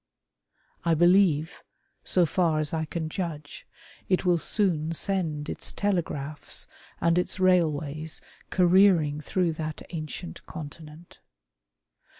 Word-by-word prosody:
I 170 -1 +3
believe, 175 -2 +3 0.4
so 180 -2 +3
far 165 -1 +1
as 150 0 +1
I 160 -1 0
can 160 +1 -4
judge, 155 -3 -6 0.4
it 185 0 +2
will 175 -2 +3
soon 165 -4 +1
send 165 -5 -1
its - - -4
telegraphs 155 -7 -2 0.3
and 170 +1 +3
its 180 - -3
railways 155 -4 +1 0.3
careering 180 -5 +4
through 175 +3 0
that 155 -1 -5
ancient 165 +1 -6
Continent. 155 +1 -10
165 Hz, 110 wpm, -27 LUFS, 155-180 Hz, 0.4 s, careering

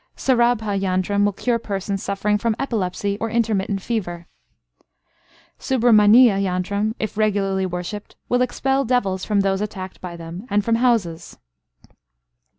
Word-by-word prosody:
Sarabha 235 -5 +1
yantram 195 +2 +1
will 205 - +2
cure 235 +4 -1
persons 195 -2 -3
suffering 205 +1 -1
from 230 0 0
epilepsy 205 -5 -2
or 225 - -1
intermittent 210 -4 -1
fever. 175 -7 -3 1.3
Subramaniya 225 -3 +5
yantram, 200 +3 -1
if 215 -1 -4
regularly 195 -3 +1
worshipped, 180 +4 -6
will 245 0 +1
expel 270 +2 0
devils 200 -7 0
from 205 -2 +1
those 195 0 0
attacked 190 -3 -6
by 180 -2 -7
them, 170 +6 -8
and 205 0 +1
from 230 0 +2
houses. 225 -10 0
205 Hz, 130 wpm, -21 LUFS, 190-230 Hz, 1.3 s, Subramaniya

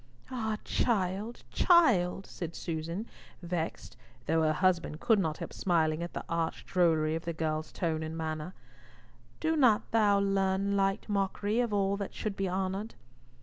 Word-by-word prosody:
"Ah, 220 -4 -2
child, 210 0 -1
child!" 200 - +4
said 170 -2 -6
Susan, 165 +5 -4 0.4
vexed, 170 -2 -4 0.3
though 160 +3 +2
her 155 -1 +3
husband 170 -2 +1
could 220 +1 +3
not 160 -4 -1
help - - -7
smiling 160 -3 +1
at 170 - -5
the - - -5
arch 165 -1 -2
drollery 160 -4 +2
of 165 +1 -3
the 170 - -2
girl's 155 -1 -2
tone 160 -3 -1
and 160 +1 -5
manner, 160 +2 -4 0.8
"do 320 0 +1
not 250 -8 +3
thou 210 -3 +4
learn 195 0 +1
light 195 +1 +1
mockery 205 +2 0
of 240 -3 +1
all 200 -1 +1
that 200 -1 -5
should 215 -2 -3
be 195 -1 -1
honoured." 190 +3 -2
190 Hz, 155 wpm, -30 LUFS, 165-205 Hz, 0.8 s, child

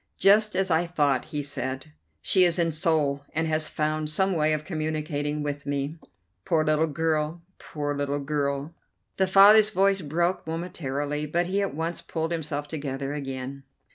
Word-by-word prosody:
"Just 210 +1 +4
as 190 -1 +1
I 165 +2 +2
thought," 145 -6 +1
he 150 -2 -4
said. 130 - -4 0.3
"She 185 - +5
is 175 -1 +4
in 170 -1 +1
Seoul 150 -4 0
and 160 +1 +1
has 155 0 0
found 155 0 -1
some 190 +5 +1
way 155 -2 +2
of 155 0 -1
communicating 155 -3 -2
with 145 -1 -4
me. 145 +3 -2 0.4
Poor 155 - +1
little 155 +1 +2
girl, 160 +2 -1 0.2
poor 145 -1 -4
little 145 0 -1
girl." 140 +1 -2 0.4
The 190 - +2
father's 205 +3 +7
voice 195 -1 +2
broke 170 +4 -1
momentarily, 150 -3 -3
but 170 +4 0
he 195 +3 0
at 195 -7 -2
once 165 +2 -3
pulled 160 0 -3
himself 150 -3 -3
together 140 -2 -4
again. 135 -1 -5
155 Hz, 165 wpm, -26 LUFS, 145-170 Hz, 0.4 s, father's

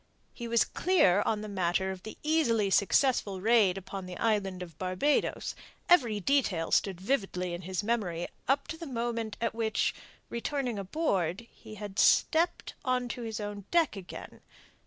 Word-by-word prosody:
He 235 - -6
was 235 0 +3
clear 265 - +3
on 215 -1 0
the 215 - -6
matter 190 -1 0
of 190 -1 -7
the 220 - -9
easily 235 -10 +2
successful 200 -1 +2
raid 210 -3 +4
upon 195 0 -6
the 180 -1 -7
Island 195 -5 0
of 170 -3 -11
Barbados; 185 +11 0 0.3
every 240 -12 +4
detail 200 -8 +1
stood 190 -3 +2
vividly 190 -5 -1
in 175 - -5
his 185 +2 -3
memory 195 -7 -1 0.2
up 280 +1 +1
to 320 - -4
the 330 -1 -7
moment 230 -4 -3
at 230 -1 -1
which, 225 -1 0 0.3
returning 245 -2 -2
aboard, 195 - -1
he 215 -1 -12
had 205 -2 -6
stepped 335 +2 +3
on 250 -1 0
to 245 - -5
his 225 -1 -4
own 205 -2 -5
deck 335 -8 +2
again. 190 -3 -9
215 Hz, 160 wpm, -30 LUFS, 190-245 Hz, 0.3 s, raid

